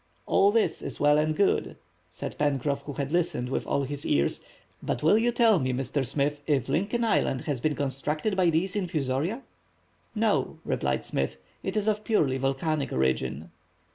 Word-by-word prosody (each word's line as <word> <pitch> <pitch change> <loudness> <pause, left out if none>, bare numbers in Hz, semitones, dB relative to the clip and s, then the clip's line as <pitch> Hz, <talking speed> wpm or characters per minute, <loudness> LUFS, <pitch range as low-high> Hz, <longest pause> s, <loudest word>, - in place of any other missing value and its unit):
"All 200 +1 +4
this 225 0 +1
is - - -5
well 145 +1 +4
and 155 0 +1
good," 200 +2 +1 0.3
said 90 - -6
Pencroff, 140 -1 0
who 145 - -5
had 140 +1 -3
listened 170 -7 0
with - - -2
all 140 - +1
his 145 +1 -5
ears, 70 0 +1 0.4
"but 120 - -3
will 160 +6 +5
you 235 +2 +3
tell 230 -5 +4
me, 130 -2 0
Mr. 135 +2 -1
Smith, 145 +3 -1
if 140 -6 +1
Lincoln 200 - 0
Island 135 - +1
has 145 -5 -2
been 150 +4 0
constructed 150 +8 -1
by 185 -2 +3
these 175 +5 0
infusoria." 170 - -1 0.7
"No," 220 -1 +1
replied 65 -1 -1
Smith, 65 0 -2 0.2
"it 190 +2 -3
is 210 0 0
of 210 0 +1
purely 145 - +1
volcanic 135 +2 -1
origin." 65 +4 -1
150 Hz, 170 wpm, -27 LUFS, 135-190 Hz, 0.7 s, will